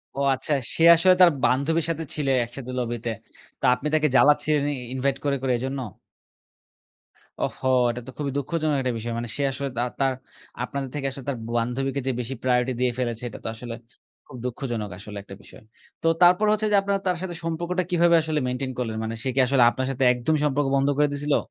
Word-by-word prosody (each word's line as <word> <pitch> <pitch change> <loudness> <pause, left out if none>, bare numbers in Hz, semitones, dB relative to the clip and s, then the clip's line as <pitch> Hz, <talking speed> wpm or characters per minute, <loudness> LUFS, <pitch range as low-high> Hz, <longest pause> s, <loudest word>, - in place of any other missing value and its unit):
ও - - -4 0.2
আচ্ছা, 135 +3 -2 0.2
সে 165 - +1
আসলে 185 +2 +5
তার 175 -2 +8
বান্ধবীর 150 +6 +2
সাথে 165 0 -2
ছিল, 150 -3 -2 0.2
একসাথে 130 +1 -8
লবিতে। 120 -1 -3 0.5
তো - - -26
আপনি 140 - -3
তাকে 155 -1 +3
জ্বালাচ্ছিলেন 150 +1 +4
ই - - -3 0.2
ইনভাইট 135 +1 0
করে, 140 -1 +1
করে, 130 - 0
এজন্য? 135 +3 -3 1.6
ওহো! 130 - -3 0.2
এটা 120 +1 -4
তো - - -7
খুবই 140 -2 -2
দুঃখজনক 155 +1 -1
একটা 130 -1 -1
বিষয়। 115 +1 -4
মানে 120 0 -4
সে 140 - -1
আসলে 140 +1 -4
দা - - +1 0.2
তার 135 -1 +2 0.5
আপনাদের 135 +1 -4
থেকে 140 -2 -2
আসলে 135 -1 -8
তার 135 - -2
বান্ধবীকে 125 +4 -1
যে - - +2
বেশি 125 +2 -3
প্রায়োরিটি 125 0 +2
দিয়ে 125 -1 +2
ফেলেছে, 120 -1 -2
এটা - - -10
তো - - -5
আসলে 115 0 -7 0.5
খুব 130 - -10
দুঃখজনক 120 -4 -3
আসলে 105 +1 -9
একটা 100 -1 -11
বিষয়। - - -15 0.4
তো - - 0
তারপর 180 +4 +6
হচ্ছে 215 0 +1
যে 205 - +5
আপনারা 200 0 0
তার 180 -1 +1
সাথে 180 -2 -4
সম্পর্কটা 175 +2 -1
কিভাবে 170 0 +4
আসলে 155 -1 -1
মেইনটেইন 130 +1 -3
করলেন? 115 -3 -2
মানে 110 +1 -3
সে 135 - 0
কি 135 - +2
আসলে 130 -2 +4
আপনার 130 +1 -3
সাথে 135 0 -1
একদমই 145 +5 0
সম্পর্ক 145 0 +1
বন্ধ 135 0 +2
করে 150 - +4
দিছিলো? 145 0 +1
135 Hz, 200 wpm, -24 LUFS, 125-155 Hz, 1.6 s, তার